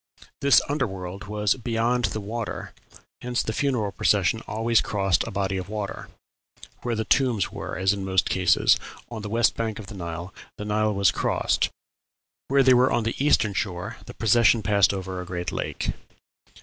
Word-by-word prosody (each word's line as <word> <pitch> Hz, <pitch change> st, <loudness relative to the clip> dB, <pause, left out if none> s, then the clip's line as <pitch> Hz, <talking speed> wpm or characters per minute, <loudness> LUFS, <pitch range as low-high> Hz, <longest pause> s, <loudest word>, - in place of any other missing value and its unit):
This 140 Hz, -1 st, +5 dB
under 145 Hz, -2 st, 0 dB
world 95 Hz, +1 st, -7 dB
was 105 Hz, 0 st, +1 dB
beyond 120 Hz, 0 st, 0 dB
the 105 Hz, +2 st, -2 dB
water, 110 Hz, +2 st, -5 dB, 0.5 s
hence 125 Hz, 0 st, -1 dB
the 110 Hz, -, -3 dB
funeral 120 Hz, -7 st, 0 dB
procession 105 Hz, +2 st, +2 dB
always 115 Hz, +2 st, +2 dB
crossed 95 Hz, -4 st, +1 dB
a -, -, -3 dB
body 95 Hz, -2 st, -1 dB
of 95 Hz, +1 st, -5 dB
water. 105 Hz, -2 st, -5 dB, 0.7 s
"Where 120 Hz, -1 st, -2 dB
the 110 Hz, 0 st, -2 dB
tombs 120 Hz, -7 st, +2 dB
were, -, -, -6 dB
as 95 Hz, +2 st, +2 dB
in 100 Hz, -1 st, -4 dB
most 95 Hz, -1 st, +1 dB
cases, 90 Hz, -2 st, +3 dB, 0.3 s
on 110 Hz, -2 st, -5 dB
the 105 Hz, -, -6 dB
west 115 Hz, +1 st, +2 dB
bank 110 Hz, -2 st, -2 dB
of 110 Hz, -, -8 dB
the 110 Hz, -, -10 dB
Nile, 85 Hz, 0 st, -6 dB, 0.2 s
the 105 Hz, -, -6 dB
Nile 105 Hz, 0 st, +1 dB
was 100 Hz, -1 st, +4 dB
crossed; -, -, 0 dB, 0.8 s
where 135 Hz, 0 st, +4 dB
they 130 Hz, 0 st, +6 dB
were 125 Hz, +1 st, +4 dB
on 120 Hz, -, +1 dB
the 115 Hz, +4 st, -2 dB
eastern 105 Hz, -8 st, +3 dB
shore 95 Hz, +3 st, -3 dB
the 120 Hz, -, -9 dB
procession 115 Hz, 0 st, +4 dB
passed 100 Hz, -1 st, +4 dB
over 95 Hz, -2 st, -4 dB
a -, -, -5 dB
sacred 90 Hz, -1 st, -4 dB
lake." -, -, -3 dB
105 Hz, 180 wpm, -25 LUFS, 95-115 Hz, 0.8 s, they